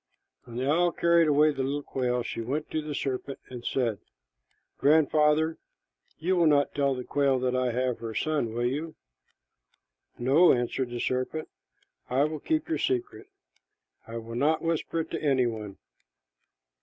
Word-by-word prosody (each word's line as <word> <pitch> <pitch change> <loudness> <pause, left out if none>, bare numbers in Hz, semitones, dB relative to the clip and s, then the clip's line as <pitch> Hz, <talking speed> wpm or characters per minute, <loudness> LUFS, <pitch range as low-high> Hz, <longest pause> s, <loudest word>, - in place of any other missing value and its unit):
When 120 -2 -11
the 130 +2 -1
owl 170 +4 +3
carried 170 -1 +3
away 150 +1 +4
the 135 - -3
little 140 +2 -2
quail, 125 -2 -1
she 115 - -4
went 140 +7 -3
to 155 - -1
the 150 -1 -5
serpent 135 0 -3
and 125 -2 -7
said, 115 -7 -1 0.8
"Grandfather, 155 +2 +3 0.6
you 180 +4 0
will 170 -2 +4
not 145 -2 +3
tell 140 -2 +1
the 125 - -5
quail 140 0 +1
that 125 0 0
I 130 -1 +1
have 125 0 -1
her 115 -1 -6
son, 145 -6 0
will 120 +1 0
you?" 150 +6 -2 1.2
"No," 140 +9 +5
answered 125 +1 -1
the 120 0 -5
serpent, 130 +6 -2 0.6
"I 130 +3 +2
will 155 0 -2
keep 315 - -1
your 325 - -1
secret. 380 +1 -2 0.8
I 115 +1 -6
will 115 0 -7
not 150 +6 +1
whisper 165 0 -1
it - - -8
to - - -3
any 135 -4 +2
one." 110 -4 -5
140 Hz, 165 wpm, -28 LUFS, 125-155 Hz, 1.2 s, No